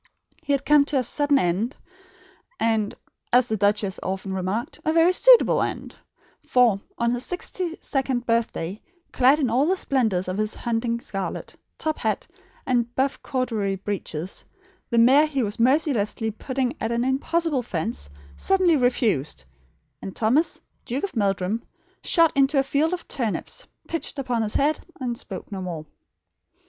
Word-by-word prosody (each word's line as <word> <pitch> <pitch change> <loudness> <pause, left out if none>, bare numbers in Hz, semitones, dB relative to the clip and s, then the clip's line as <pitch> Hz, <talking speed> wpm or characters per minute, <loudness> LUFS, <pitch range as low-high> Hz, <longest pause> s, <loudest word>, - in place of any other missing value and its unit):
He - - -3
had 280 -1 +1
come 295 -1 +6
to 290 -1 -1
a 255 - +2
sudden 245 - +1 0.8
and, 220 -2 +1 0.4
as 245 0 +5
the 220 - 0
duchess 205 -1 +1
often 190 +1 -3
remarked, 190 +9 -3
very 330 +3 +4
suitable - - +6
end; - - -4 0.5
for, 235 -6 +3 0.2
on 235 0 +1
his 245 0 0
sixty 360 0 -4
second 265 -3 -1
birthday, 220 -5 -1 0.3
clad 265 +3 +5
in 265 -7 0
all 265 +6 +3
the 380 +2 +2
splendours 220 - +1
of 185 +2 -3
his 215 0 -1
hunting 235 0 -1
scarlet, 195 -4 -5 0.2
top 315 -1 -2
hat, - - -1 0.4
and 240 -2 0
buff 270 +1 0
corduroy 225 -8 -1
breeches, 190 -3 -4 0.5
the 235 - 0
mare 265 +6 +6
he 275 -4 -1
was 205 +2 -3
mercilessly 235 -4 +1
putting 260 +4 -2
at 225 - -1
an 235 +1 0
impossible 290 +2 0
fence 140 - -4 0.3
suddenly 375 -4 +3
refused, 225 - +1 0.6
and 190 - -7
Thomas, 255 +9 +2 0.2
Duke 255 +4 -3
of 400 - -3
Meldrum, 200 0 0 0.4
shot 330 -3 +4
into 275 +1 +3
a 270 - +4
field 290 +5 +1
of 360 - -4
turnips; 235 -6 -3 0.2
pitched 330 -3 -3
upon 250 -4 -1
his 215 -1 -2
head, 295 +3 +2 0.2
and 245 -3 -2
spoke 195 -4 -8
no 195 -2 -4
more. 170 -4 -5
240 Hz, 150 wpm, -24 LUFS, 205-280 Hz, 0.8 s, come